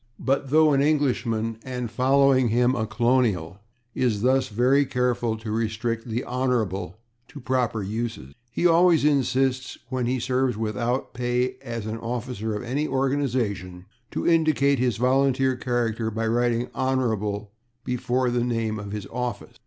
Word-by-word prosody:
But 135 +1 -1
though 155 +1 +5
an 135 - +3
Englishman, 120 -7 0
and, 125 -3 -4
following 130 +1 +3
him, 120 +3 +2
a 110 -4 -1
colonial, 110 -6 +1 0.3
is 115 -5 0
thus 130 +1 +3
very 125 +6 +3
careful 125 -3 0
to 110 -1 -6
restrict 115 +1 -2
/the 115 +2 -2
Hon./ 115 -8 -1 0.3
to 145 - -11
proper 125 -4 -1
uses, 110 - -4 0.2
he 170 - -2
always 170 -3 +5
insists, 130 -2 +1
when 125 -2 -1
he 130 +1 0
serves 125 -1 0
without 115 +4 -2
pay 125 0 -1
as 115 -4 -5
an 110 +1 -4
officer 115 -2 -4
of 105 - -4
any 140 +5 -1
organization, 125 -10 -1 0.2
to - - -3
indicate 155 -5 +3
his 125 -4 +1
volunteer 130 +1 +2
character 120 -3 -1
by 115 +1 -2
writing 120 +1 +1
/Hon./ 110 -6 -1 0.4
before 125 0 0
the 120 0 +1
name 115 -3 -1
of 100 0 -7
his 105 -2 -4
office. 125 0 -5
125 Hz, 145 wpm, -25 LUFS, 110-130 Hz, 0.4 s, though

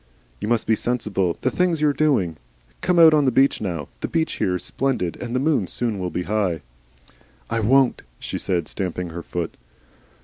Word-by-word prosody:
"You - - -4
must 120 0 +1
be 110 - +3
sensible. 105 -8 -1
The 130 - +1
thing's 180 -3 +1
your 150 -1 +3
own - - -7
doing. 120 - +1 0.4
Come 180 - +1
out 165 -2 +8
on 150 -2 +4
the 130 - +3
beach 135 +3 +3
now 85 -8 -3
the - - -2
beach 160 -1 -1
here 90 - +1
is 90 - -4
splendid, 125 -11 -1
and 120 0 -4
the - - +2
moon 150 +2 +2
will 95 - -4
soon 100 -6 -2
be 90 - -3
high." 95 -6 -1 0.9
"I 115 - +1
WON'T" 130 +4 +3 0.2
she - - -5
said, 85 -4 -1
stamping 90 -2 -3
her 85 +1 -6
foot. 85 0 -4
110 Hz, 200 wpm, -23 LUFS, 90-135 Hz, 0.9 s, out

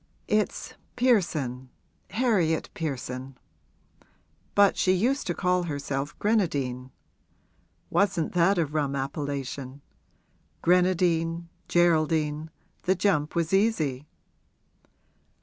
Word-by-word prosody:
'It's 210 0 -1 0.2
Pearson 155 - +1 0.4
Harriet 200 -10 +1
Pearson; 135 -6 -5 1.2
but 200 -1 +5
she 185 - +3
used 245 +10 +1
to 175 - -1
call 180 -1 +1
herself 145 -3 -3
Grenadine 140 - 0 1.0
wasn't 195 -5 +1
that 180 +2 +3
a 170 - +2
rum 145 -2 -1
appellation? 140 -1 -4 0.8
Grenadine 170 -2 +2 0.2
Geraldine 155 -2 +2 0.3
the 190 - +2
jump 165 -5 +1
was 170 +1 0
easy.' 155 - +1
165 Hz, 85 wpm, -27 LUFS, 140-185 Hz, 1.2 s, but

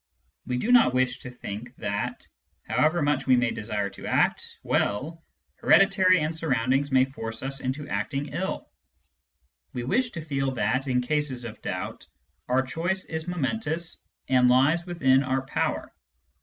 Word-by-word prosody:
We 125 - -1
do 225 - 0
not 235 - +6
wish 130 -1 +1
to 125 - -8
think 120 0 -8
that, 100 -2 -3 0.4
however 160 +1 +2
much 145 -2 0
we 130 - +6
may 125 -1 +2
desire 105 -2 -3
to - - -9
act - - +1
well, 155 +11 -1 0.3
heredity 190 -2 +5
and 155 0 -1
surroundings 135 -2 0
may 130 0 +5
force 115 -4 -6
us 135 +1 -2
into 135 +3 -3
acting 135 +8 -2
ill. 175 +7 -3 1.1
We 125 - -3
wish 235 - +1
to 165 -3 -6
feel 135 -3 -1
that, 125 +4 0
in 125 -1 +2
cases 135 -2 -2
of 110 - -8
doubt, - - -5 0.4
our 130 +1 +2
choice 175 +8 -2
is 160 +1 -5
momentous 170 0 -1 0.3
and 125 -1 +4
lies 145 +8 +3
within 135 -7 +3
our 130 -1 -1
power. 135 - -2
135 Hz, 155 wpm, -26 LUFS, 125-160 Hz, 1.1 s, not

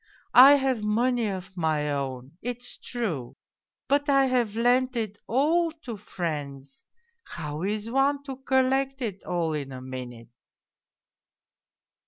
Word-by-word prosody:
I 265 +3 +10
have 265 -4 0
money 235 +2 +1
of 190 -1 -6
my 155 -4 0
own, 135 -2 -4
it's 245 +1 -4
true, 175 - -4 0.5
but 285 +1 +2
I 275 -1 +5
have 245 -5 0
lent 250 +2 +2
it 215 -3 -3
all 320 +7 +2
to 235 -3 -5
friends 145 -8 -5 0.4
how 150 -2 -6
is 210 +3 -2
one 275 +3 +1
to 270 -2 -7
collect 265 0 +1
it 200 -4 -4
all 170 -3 -1
in 140 -3 -4
a 130 - -7
minute 125 -3 -8
220 Hz, 130 wpm, -26 LUFS, -, 0.5 s, I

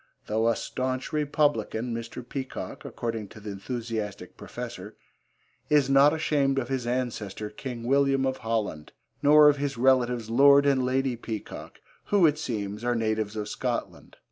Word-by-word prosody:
Though 110 +2 0
a 115 - +3
staunch 130 +4 -3
Republican, 145 -6 0
Mr. 115 +1 -6
Peacock, 135 -1 -6
according 115 -3 -4
to 110 - -13
the 105 0 -7
enthusiastic 105 -2 -5
Professor, - - -8 0.7
is 145 -2 +3
not 140 +2 +6
ashamed 145 -3 +1
of 125 -2 -1
his 130 -3 -2
ancestor 115 -4 -3
King 120 0 -7
William 135 +1 +2
of 130 0 -1
Holland, 110 -10 -3 0.3
nor 150 +1 +7
of 145 -1 +5
his 140 -2 -3
relatives 125 -2 +2
Lord 140 +4 +6
and 135 -2 +3
Lady 130 0 0
Peacock 110 -2 -7 0.2
who, 200 -4 +4
it 155 -1 +3
seems, 105 -6 -4
are 120 0 +1
natives 110 -2 -1
of 105 -1 -3
Scotland. - - -4
125 Hz, 150 wpm, -27 LUFS, 110-140 Hz, 0.7 s, nor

